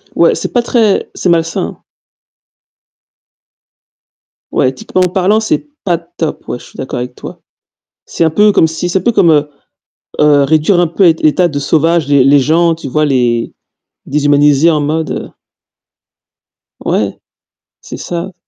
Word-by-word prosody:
Ouais, -, -, +3 dB
c'est -, -, -5 dB
pas 245 Hz, -, +1 dB
très 225 Hz, -4 st, +1 dB
c'est -, -, -2 dB
malsain. 165 Hz, -1 st, -1 dB, 2.7 s
Ouais, 130 Hz, -, +1 dB
éthiquement 135 Hz, +7 st, -2 dB
parlant, 190 Hz, +4 st, +1 dB
c'est 225 Hz, +6 st, -2 dB, 0.2 s
pas 175 Hz, -3 st, 0 dB
top. 170 Hz, -2 st, -6 dB
Ouais, -, -, -4 dB
je -, -, -15 dB
suis -, -, -17 dB
d'accord 130 Hz, -, -5 dB
avec 125 Hz, 0 st, -6 dB
toi. -, -, -10 dB, 0.7 s
C'est -, -, -2 dB
un 160 Hz, -, +3 dB
peu 210 Hz, +6 st, +3 dB
comme 165 Hz, -, +3 dB
si 160 Hz, +2 st, -4 dB
c'est 190 Hz, -, +1 dB
un -, -, -8 dB
peu 240 Hz, -, +1 dB
comme, 175 Hz, -7 st, +3 dB
heu 150 Hz, -1 st, +2 dB, 0.7 s
heu, 150 Hz, -1 st, +4 dB
réduire 160 Hz, +5 st, +2 dB
un 175 Hz, -, +2 dB
peu 180 Hz, +4 st, +1 dB
l'ét 165 Hz, -2 st, +3 dB
état 175 Hz, +4 st, +3 dB
de 145 Hz, -3 st, -4 dB
sauvage 160 Hz, +2 st, +1 dB
les 140 Hz, -2 st, +4 dB
les 140 Hz, +1 st, +5 dB
gens, 165 Hz, +4 st, +2 dB
tu 160 Hz, -4 st, -8 dB
vois, 155 Hz, +4 st, 0 dB
les 120 Hz, -5 st, 0 dB, 0.5 s
déshumaniser, 145 Hz, +1 st, +3 dB
en 155 Hz, -2 st, +1 dB
mode 155 Hz, +1 st, -3 dB, 1.5 s
Ouais, -, -, -1 dB, 0.6 s
c'est -, -, -9 dB
ça. 175 Hz, +2 st, -5 dB
160 Hz, 155 wpm, -13 LUFS, 145-175 Hz, 2.7 s, les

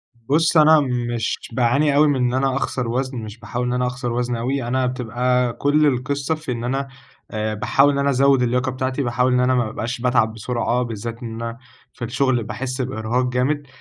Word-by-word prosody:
بُص، 150 Hz, +8 st, +1 dB
أنا 155 Hz, 0 st, +7 dB
مش 120 Hz, -4 st, -2 dB
باعاني 140 Hz, +5 st, +2 dB
أوي 150 Hz, +1 st, +5 dB
من 145 Hz, -, +2 dB
إن 125 Hz, -1 st, +1 dB
أنا 135 Hz, 0 st, +1 dB
أخسر 125 Hz, -3 st, -2 dB
وزن، 130 Hz, +2 st, -2 dB
مش 110 Hz, 0 st, -7 dB
باحاول 125 Hz, 0 st, -3 dB
إن 125 Hz, -, -1 dB
أنا 125 Hz, 0 st, 0 dB
أخسر 125 Hz, -1 st, -3 dB
وزن 120 Hz, 0 st, -1 dB
أوي. 130 Hz, +3 st, -2 dB
أنا 130 Hz, +1 st, +1 dB
بتبقى 125 Hz, 0 st, 0 dB
كل 150 Hz, +2 st, +2 dB
القصة 140 Hz, +2 st, 0 dB
في 155 Hz, -4 st, -6 dB
إن 115 Hz, -1 st, -3 dB
أنا، 135 Hz, +3 st, -1 dB, 0.4 s
آآ، 110 Hz, -1 st, -2 dB
باحاول 135 Hz, +7 st, +3 dB
إن 140 Hz, -, -1 dB
أنا 140 Hz, 0 st, +2 dB
أزود 135 Hz, 0 st, +4 dB
اللياقة 125 Hz, +2 st, +1 dB
بتاعتي، 130 Hz, +2 st, -2 dB
باحاول 125 Hz, +1 st, +1 dB
إن 125 Hz, -, +3 dB
أنا 130 Hz, +1 st, +3 dB
ما 120 Hz, -2 st, +2 dB
بابقاش 115 Hz, +2 st, -4 dB
باتعب 120 Hz, -3 st, +2 dB
بسرعة، 120 Hz, +2 st, -1 dB
بالذات 115 Hz, +1 st, -6 dB
إن 115 Hz, -, -5 dB
أنا 115 Hz, 0 st, -5 dB, 0.4 s
في 120 Hz, -, -5 dB
الشغل 130 Hz, -1 st, +1 dB
باحس 125 Hz, +5 st, -4 dB
بإرهاق 125 Hz, 0 st, -1 dB
جامد، 140 Hz, +3 st, 0 dB
125 Hz, 200 wpm, -21 LUFS, 120-135 Hz, 0.4 s, أنا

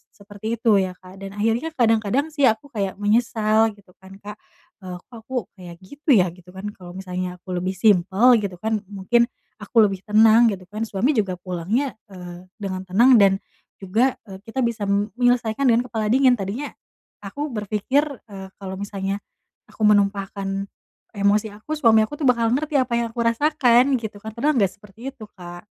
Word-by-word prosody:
seperti 205 Hz, +2 st, -6 dB
itu 225 Hz, -3 st, +3 dB
ya 185 Hz, -1 st, -2 dB
Kak. 185 Hz, +1 st, -15 dB
Dan 195 Hz, 0 st, -8 dB
akhirnya 225 Hz, +8 st, 0 dB
kadang-kadang 235 Hz, +5 st, +1 dB
sih 285 Hz, -3 st, +3 dB
aku 230 Hz, +5 st, -1 dB
kayak 200 Hz, -5 st, -3 dB
menyesal 215 Hz, +1 st, +2 dB
gitu 200 Hz, -3 st, -22 dB
kan 190 Hz, +1 st, -14 dB
Kak, 210 Hz, +1 st, -9 dB, 0.4 s
eee, 185 Hz, -2 st, -7 dB
"Kok -, -, -66 dB, 0.2 s
aku 260 Hz, -, -6 dB, 0.2 s
kayak 175 Hz, -1 st, -10 dB
gitu 285 Hz, -, +1 dB
ya?" 180 Hz, -3 st, +3 dB
Gitu 180 Hz, 0 st, -19 dB
kan, 190 Hz, +2 st, -6 dB
kalau 180 Hz, -3 st, -12 dB
misalnya 185 Hz, -1 st, -5 dB
aku 185 Hz, -, -9 dB
lebih 185 Hz, +1 st, -3 dB
simpel 205 Hz, +5 st, +4 dB
gitu 200 Hz, -3 st, -4 dB
kan, 215 Hz, +4 st, -2 dB
mungkin 210 Hz, +4 st, +1 dB, 0.3 s
aku 220 Hz, +2 st, +3 dB
lebih 195 Hz, -2 st, 0 dB
tenang 220 Hz, +2 st, +6 dB
gitu 190 Hz, -2 st, -6 dB
kan, 215 Hz, +2 st, -3 dB
suami 215 Hz, +9 st, +1 dB
juga 205 Hz, -9 st, 0 dB
pulangnya, 185 Hz, +9 st, -2 dB, 0.2 s
eee, 180 Hz, -1 st, -10 dB
dengan 190 Hz, -3 st, -5 dB
tenang 235 Hz, +6 st, +5 dB
dan 195 Hz, -1 st, +5 dB, 0.5 s
juga, 220 Hz, +8 st, +2 dB, 0.2 s
eee, 190 Hz, 0 st, -9 dB
kita 230 Hz, +4 st, -5 dB
bisa 235 Hz, -3 st, -1 dB
mm 200 Hz, +2 st, -1 dB
menyelesaikan 245 Hz, 0 st, +1 dB
dengan 245 Hz, +1 st, +3 dB
kepala 220 Hz, -2 st, -2 dB
dingin, 260 Hz, 0 st, +5 dB
tadinya 210 Hz, +9 st, -4 dB, 0.6 s
aku 285 Hz, +10 st, -4 dB
berpikir, 215 Hz, +5 st, 0 dB, 0.2 s
eee, 195 Hz, -2 st, -9 dB
kalo 190 Hz, -1 st, -6 dB
misalnya 200 Hz, 0 st, -4 dB, 0.5 s
aku -, -, -15 dB
menumpahkan 200 Hz, -1 st, 0 dB, 0.5 s
emosi 205 Hz, +2 st, +2 dB
aku, 260 Hz, +9 st, -6 dB
suami 220 Hz, -5 st, +5 dB
aku 295 Hz, +8 st, -6 dB
tuh 290 Hz, -, +1 dB
bakal 235 Hz, -2 st, +2 dB
ngerti 295 Hz, +4 st, -1 dB
apa 250 Hz, -2 st, -1 dB
yang 235 Hz, -, -1 dB
aku 235 Hz, -1 st, -1 dB
rasakan 255 Hz, +1 st, +3 dB
gitu 215 Hz, -2 st, -7 dB
kan, 220 Hz, +2 st, -8 dB
padahal 290 Hz, +5 st, +1 dB
nggak 195 Hz, -3 st, +2 dB
seperti 210 Hz, +6 st, -10 dB
itu 225 Hz, -, -11 dB
Kak. 175 Hz, -1 st, -11 dB
210 Hz, 180 wpm, -22 LUFS, 195-235 Hz, 0.6 s, tenang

